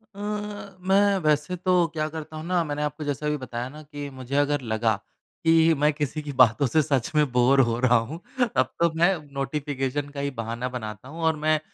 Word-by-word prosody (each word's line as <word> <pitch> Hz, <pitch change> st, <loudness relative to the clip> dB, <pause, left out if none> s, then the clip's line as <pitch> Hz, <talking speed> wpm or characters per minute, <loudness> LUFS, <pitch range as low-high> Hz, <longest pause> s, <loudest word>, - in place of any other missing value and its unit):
अ, -, -, -11 dB, 0.6 s
मैं 195 Hz, +2 st, +3 dB
वैसे 150 Hz, +3 st, +1 dB
तो 180 Hz, -1 st, +2 dB
क्या 155 Hz, -1 st, -1 dB
करता 155 Hz, 0 st, -7 dB
हूँ 155 Hz, -, -6 dB
ना, 175 Hz, -1 st, +1 dB
मैंने 150 Hz, -1 st, -3 dB
आपको 150 Hz, +1 st, -3 dB
जैसे 145 Hz, 0 st, -3 dB
अभी 150 Hz, 0 st, 0 dB
बताया 125 Hz, -2 st, -5 dB
ना 150 Hz, +3 st, -11 dB
कि 145 Hz, -1 st, -7 dB
मुझे 130 Hz, +2 st, -5 dB
अगर 145 Hz, 0 st, +2 dB
लगा 110 Hz, -2 st, +1 dB, 0.5 s
कि 165 Hz, 0 st, +5 dB
मैं 150 Hz, +2 st, +3 dB
किसी 150 Hz, +1 st, -3 dB
की 145 Hz, -1 st, -6 dB
बातों 115 Hz, +2 st, +5 dB
से 155 Hz, +6 st, +3 dB
सच 135 Hz, -5 st, 0 dB
में 150 Hz, -3 st, +3 dB
बोर 125 Hz, +3 st, +4 dB
हो 115 Hz, -, -1 dB
रहा 125 Hz, -1 st, +4 dB
हूँ, 160 Hz, +3 st, -6 dB, 0.4 s
तब -, -, +3 dB
तो 170 Hz, -1 st, +3 dB
मैं 175 Hz, +3 st, +3 dB, 0.2 s
नोटिफिकेशन 140 Hz, 0 st, -2 dB
का 145 Hz, 0 st, -8 dB
ही 140 Hz, 0 st, -1 dB
बहाना 115 Hz, 0 st, -4 dB
बनाता 110 Hz, -2 st, -7 dB
हूँ, 165 Hz, +3 st, -8 dB
और 160 Hz, -1 st, +2 dB
मैं 155 Hz, +1 st, +1 dB
145 Hz, 210 wpm, -25 LUFS, 130-160 Hz, 0.6 s, कि